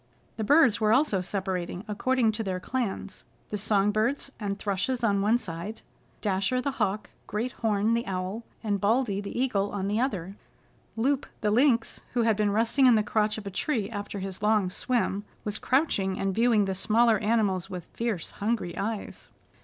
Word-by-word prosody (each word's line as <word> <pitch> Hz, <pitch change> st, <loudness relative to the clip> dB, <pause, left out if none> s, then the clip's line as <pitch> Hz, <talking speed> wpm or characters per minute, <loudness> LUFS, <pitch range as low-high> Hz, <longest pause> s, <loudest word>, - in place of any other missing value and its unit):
The 220 Hz, -, -2 dB
birds 260 Hz, -2 st, +5 dB
were 215 Hz, 0 st, +3 dB
also 235 Hz, -6 st, +3 dB
separating 185 Hz, -1 st, -3 dB
according 230 Hz, +2 st, +1 dB
to 215 Hz, +1 st, -3 dB
their 185 Hz, -3 st, -2 dB
clans 200 Hz, -3 st, -3 dB, 0.3 s
the 210 Hz, -, -1 dB
song 205 Hz, -1 st, +2 dB
birds 240 Hz, +6 st, 0 dB
and 200 Hz, -2 st, -2 dB
thrushes 205 Hz, +5 st, -1 dB
on 200 Hz, -3 st, +2 dB
one 215 Hz, +4 st, +4 dB
side, 190 Hz, 0 st, -6 dB, 0.4 s
and -, -, -35 dB
Dasher 200 Hz, +5 st, +1 dB
the 280 Hz, +2 st, -1 dB
Hawk, 210 Hz, -5 st, -2 dB, 0.2 s
Great 230 Hz, +4 st, -2 dB
Horn 215 Hz, -1 st, +1 dB
the 235 Hz, +1 st, -1 dB
Owl 190 Hz, +4 st, -3 dB, 0.2 s
and 205 Hz, -3 st, -1 dB
Baldy 210 Hz, -1 st, +1 dB
the 205 Hz, +4 st, -5 dB
Eagle 205 Hz, -6 st, +1 dB
on 195 Hz, -1 st, -3 dB
the 210 Hz, +2 st, 0 dB
other. 195 Hz, -7 st, -2 dB, 0.6 s
Loup 270 Hz, +4 st, +1 dB
the 210 Hz, -, +1 dB
Lynx, 235 Hz, 0 st, +2 dB
who 240 Hz, -2 st, +2 dB
had 225 Hz, -2 st, +3 dB
been 210 Hz, 0 st, +1 dB
resting 230 Hz, +6 st, +3 dB
in 245 Hz, -, +7 dB
the 215 Hz, -, +3 dB
crotch 210 Hz, 0 st, +1 dB
of 215 Hz, -, -7 dB
a 200 Hz, -, -5 dB
tree 215 Hz, 0 st, -1 dB
after 205 Hz, -1 st, -5 dB
his 195 Hz, -1 st, -5 dB
long 210 Hz, -3 st, +2 dB
swim, 215 Hz, -2 st, -1 dB, 0.2 s
was 210 Hz, 0 st, -2 dB
crouching 205 Hz, -9 st, +1 dB
and 195 Hz, 0 st, -1 dB
viewing 225 Hz, -1 st, +3 dB
the 190 Hz, -, -1 dB
smaller 220 Hz, +3 st, +3 dB
animals 205 Hz, -4 st, +1 dB
with 180 Hz, -3 st, -6 dB
fierce, 230 Hz, -7 st, -2 dB
hungry 205 Hz, -5 st, -2 dB
eyes. 215 Hz, +1 st, -4 dB
210 Hz, 185 wpm, -27 LUFS, 195-235 Hz, 0.6 s, in